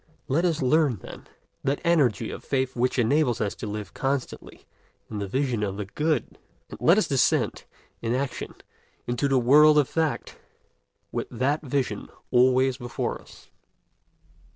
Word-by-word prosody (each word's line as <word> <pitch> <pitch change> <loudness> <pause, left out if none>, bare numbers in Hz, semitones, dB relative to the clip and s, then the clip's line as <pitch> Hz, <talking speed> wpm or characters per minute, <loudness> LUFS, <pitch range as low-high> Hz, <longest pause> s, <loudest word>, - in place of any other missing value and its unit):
Let 160 +7 +1
us 160 -5 0
learn, 145 -1 +3
then, - - -11 0.4
that 140 +1 0
energy 150 - +2
of - - -8
faith 130 -1 -1
which 125 +2 0
enables 125 0 +2
us 105 -4 -1
to - - -5
live 105 -2 -6
constantly 135 -1 -4 0.5
in 105 - -4
the 100 - -3
vision 130 0 -1
of 100 -2 -2
the 105 - -4
good; 150 +5 -2 0.3
and - - -10
let 170 +5 +5
us 215 - +2
descend, 130 -4 +1 0.4
in 115 +1 -1
action, 135 0 -4 0.5
into 120 +4 0
the 135 -1 +2
world 150 +5 +6
of 145 -3 +4
fact, 160 -3 -2 0.7
with - - -3
that 140 +4 0
vision 140 -3 -2 0.2
always 130 +1 +4
before 120 -3 -4
us. - - -18
130 Hz, 155 wpm, -25 LUFS, 120-145 Hz, 0.7 s, world